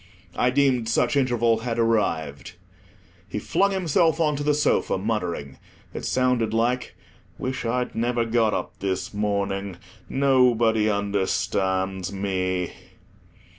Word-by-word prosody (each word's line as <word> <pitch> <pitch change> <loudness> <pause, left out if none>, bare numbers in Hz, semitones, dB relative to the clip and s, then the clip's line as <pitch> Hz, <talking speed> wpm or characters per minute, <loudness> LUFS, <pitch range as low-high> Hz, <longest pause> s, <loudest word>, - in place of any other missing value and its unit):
I 125 - +2
deemed 125 -3 +2
such 115 - +1
interval 120 -4 +2
had 115 0 -3
arrived. 85 -10 0 0.8
He 90 - -4
flung 195 - +1
himself 170 -3 +1
on 155 -2 +2
to 145 - -4
the 150 0 +2
sofa, 150 -8 +1
muttering. 90 -9 -3 0.3
It - - -5
sounded 125 -4 +1
like—"Wish 125 +2 -3
I'd 125 +2 -1
never 120 +1 0
got 115 -1 +2
up - - -5
this 95 +1 -3
morning. 100 -2 -2 0.3
Nobody 120 -5 +3
understands 95 -2 -1
me." 95 -2 -2
115 Hz, 115 wpm, -24 LUFS, 100-125 Hz, 0.8 s, Nobody